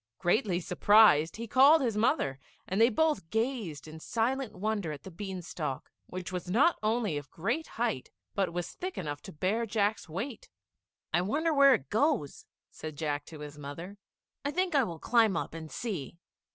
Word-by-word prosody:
Greatly 180 - +1
surprised, 185 -3 +5
he 230 - -5
called 275 +7 +7
his 240 -6 0
mother, 210 - +1 0.3
and 190 +4 0
they 230 - +7
both 300 - +1
gazed 220 - -2
in 155 +1 -9
silent 235 +6 -1
wonder 200 -3 -2
at 150 - -8
the 190 - -9
bean 190 0 -6
stalk, 150 -5 -5 0.2
which 185 0 -6
was 180 -1 -4
not 270 - +3
only 215 -6 0
of 145 - -14
great 235 - -2
height, 225 - -1 0.2
but 195 -3 0
was 175 0 -4
thick 370 +1 -6
enough 145 -4 -4
to - - -10
bear 190 +9 0
Jack's 210 -3 0
weight. 215 - -5 0.6
"I 175 - +3
wonder 305 - 0
where 275 -2 +7
it 135 - -8
goes?" 235 - 0 0.2
said 155 -2 -8
Jack 145 -2 -2
to 155 -2 -10
his 150 0 -8
mother; 165 +8 -8 0.4
"I 285 - -1
think 360 +3 0
I 275 -2 +4
will 170 -7 -4
climb 220 0 +3
up - - -3
and 160 -1 -7
see." 180 - -4
200 Hz, 180 wpm, -30 LUFS, 160-240 Hz, 0.6 s, called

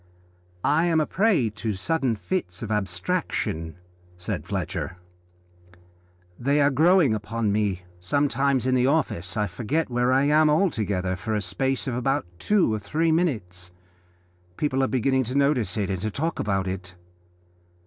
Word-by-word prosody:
"I 155 +4 +3
am 165 -2 +3
a 155 - +2
prey 185 - +2
to 110 0 -3
sudden 130 - 0
fits 105 - -4
of 110 - -5
abstraction," 85 -4 -2 0.4
said 90 - -4
Fletcher, 90 - -3 1.4
"they 140 +4 +2
are 145 0 +4
growing 160 -1 +4
upon 110 0 -1
me. 100 -3 0 0.2
Sometimes 135 +5 +1
in 130 - +2
the 125 0 +3
office 95 - 0
I 105 - +2
forget 120 - -2
where 125 +1 +2
I 135 +1 +4
am 150 +2 +4
altogether 105 - +1
for 100 +5 -3
a 105 - 0
space 130 +10 -1
of 130 - -1
about 135 +4 0
two 200 - +2
or 110 - -1
three 160 +10 0
minutes; 100 - -1 0.9
people 135 -3 0
are 130 - +2
beginning 130 +1 +1
to 125 +4 -5
notice 130 -10 +1
it 100 -2 -1
and 95 -2 -3
to 110 - -1
talk 160 +9 -3
about 95 -2 0
it. 90 -1 -6
125 Hz, 155 wpm, -25 LUFS, 100-145 Hz, 1.4 s, are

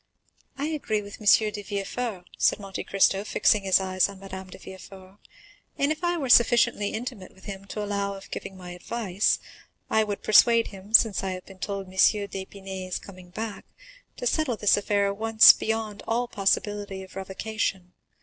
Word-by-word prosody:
"I 280 - -2
agree 225 -9 -2
with 205 +2 -11
M. 210 +1 +4
de 210 0 -6
Villefort," 200 0 -4
said - - +3
Monte 195 -2 -6
Cristo, 195 0 +2
fixing 210 0 +2
his 190 0 +4
eyes 185 0 +1
on 195 -1 -11
Madame 190 -1 -9
de - - -11
Villefort; 190 +1 -13 0.6
"and 280 +2 +1
if 315 +3 -4
I 345 0 +1
were 280 -5 -3
sufficiently 235 -3 +4
intimate 220 -4 -7
with 190 - -20
him 195 -1 -7
to 210 +1 -5
allow 200 -1 -2
of 195 - -13
giving 190 - -7
my 180 -1 -9
advice, 195 +1 -1 0.5
I 220 - +4
would 205 -1 -5
persuade 230 +2 +5
him, 195 0 -13
since 220 -5 +4
I 190 -1 -2
have 185 0 -8
been 195 -1 -15
told 200 0 -4
M. 185 - -15
d'Épinay 190 -1 -1
is 185 - -3
coming 185 -2 -13
back, 215 +3 -6 0.5
to - - -5
settle 310 - 0
this 210 - +4
affair 205 0 0
at 200 0 -2
once 225 0 +8
beyond 220 -2 -3
all 240 +2 0
possibility 205 -2 -1
of 190 - -15
revocation. 190 -1 -4
200 Hz, 180 wpm, -26 LUFS, 190-220 Hz, 0.6 s, once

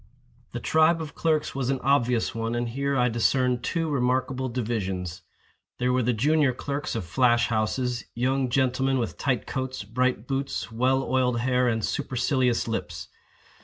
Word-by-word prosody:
The 120 - -3
tribe 160 +6 +3
of 155 -2 -6
clerks 155 -2 0
was 135 -2 -2
an 135 -1 0
obvious 125 -4 +2
one 115 +1 -2
and 120 0 -1
here 140 +3 -1
I 125 0 +3
discerned 125 +1 +1
two 165 -2 -1
remarkable 130 -1 0
divisions. 95 -7 -3 0.6
There 125 0 +1
were 130 - +2
the 125 +1 +1
junior 140 +4 +2
clerks 140 +1 -4
of 110 -6 -3
flash 120 +8 +3
houses—young 125 +3 -1
gentlemen 130 +1 +1
with 115 -3 -3
tight 130 -5 0
coats, 130 -3 -4
bright 125 +2 -1
boots, 135 -2 -3
well 130 +4 +1
oiled 125 -3 +1
hair, 125 0 +2
and 110 -2 0
supercilious 125 -2 0
lips. 85 -8 -4
125 Hz, 155 wpm, -26 LUFS, 120-135 Hz, 0.6 s, tribe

